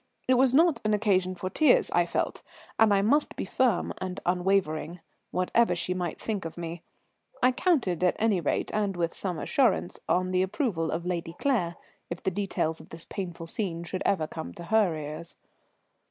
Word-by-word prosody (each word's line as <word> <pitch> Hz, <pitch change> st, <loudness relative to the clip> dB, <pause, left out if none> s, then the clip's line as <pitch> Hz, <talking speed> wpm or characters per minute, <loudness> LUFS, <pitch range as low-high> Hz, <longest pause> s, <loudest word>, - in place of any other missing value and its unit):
It 255 Hz, -, +5 dB
was 255 Hz, 0 st, +4 dB
not 330 Hz, +1 st, +4 dB
an 215 Hz, 0 st, +2 dB
occasion 190 Hz, -3 st, +1 dB
for 185 Hz, +1 st, -5 dB
tears, 320 Hz, -, +4 dB
I -, -, +3 dB
felt; -, -, -2 dB, 0.4 s
and 220 Hz, -1 st, +6 dB
I 200 Hz, -1 st, +3 dB
must 290 Hz, +8 st, +2 dB
be -, -, -3 dB
firm 230 Hz, -1 st, +1 dB
and 185 Hz, 0 st, -4 dB
unwavering, 180 Hz, -2 st, 0 dB, 0.3 s
whatever 185 Hz, +6 st, +2 dB
she 180 Hz, -, -1 dB
might 180 Hz, -2 st, -3 dB
think 210 Hz, -4 st, -3 dB
of 165 Hz, +1 st, -7 dB
me. 170 Hz, 0 st, -5 dB, 0.6 s
I 255 Hz, -, +6 dB
counted, 250 Hz, -, +1 dB
at 180 Hz, -, +3 dB
any 210 Hz, -5 st, +2 dB
rate, 150 Hz, -, -1 dB
and 200 Hz, -3 st, 0 dB
with 170 Hz, -1 st, -1 dB
some 180 Hz, -4 st, -2 dB
assurance, 250 Hz, -, +1 dB
on 185 Hz, 0 st, +2 dB
the 185 Hz, 0 st, +2 dB
approval 190 Hz, -, -1 dB
of 170 Hz, +2 st, -3 dB
Lady 170 Hz, -2 st, -3 dB
Claire 195 Hz, -12 st, 0 dB, 0.3 s
if 170 Hz, -, -6 dB
the 190 Hz, -, +1 dB
details 175 Hz, -4 st, -2 dB
of -, -, -16 dB
this 165 Hz, 0 st, -3 dB
painful 175 Hz, -3 st, -6 dB
scene 170 Hz, -1 st, -3 dB
should 185 Hz, +2 st, -4 dB
ever 175 Hz, -6 st, +1 dB
come 160 Hz, +1 st, -7 dB
to 170 Hz, -, -8 dB
her 195 Hz, -3 st, +2 dB
ears. 155 Hz, +2 st, -7 dB
185 Hz, 185 wpm, -28 LUFS, 170-215 Hz, 0.6 s, and